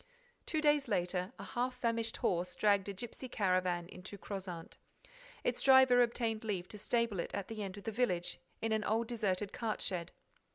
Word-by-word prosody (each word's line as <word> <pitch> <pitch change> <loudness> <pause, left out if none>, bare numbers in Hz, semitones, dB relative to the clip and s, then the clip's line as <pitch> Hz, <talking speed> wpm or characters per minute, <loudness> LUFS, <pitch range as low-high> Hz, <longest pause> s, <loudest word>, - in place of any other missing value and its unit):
Two 315 - 0
days 295 -2 +4
later, 180 -2 0
a - - -7
half 250 +1 -2
famished 230 -2 0
horse 180 0 0
dragged 200 0 +3
a - - -3
gipsy 240 +5 -7
caravan 185 -4 +1
into 185 +2 -9
Crozant. 185 -4 -6 0.6
Its - - 0
driver 260 -2 +7
obtained 230 -2 0
leave 195 -5 -2
to 210 - -7
stable 230 -2 +1
it - - -2
at 200 -2 -4
the 220 -1 -5
end 195 -1 -5
of 200 - -9
the 225 - -2
village, 200 -7 0 0.2
in 225 - +1
an 220 -1 +1
old 225 +3 +1
deserted 205 -4 -1
cart 225 -2 -2
shed. 175 -2 -2
210 Hz, 180 wpm, -35 LUFS, 185-235 Hz, 0.6 s, driver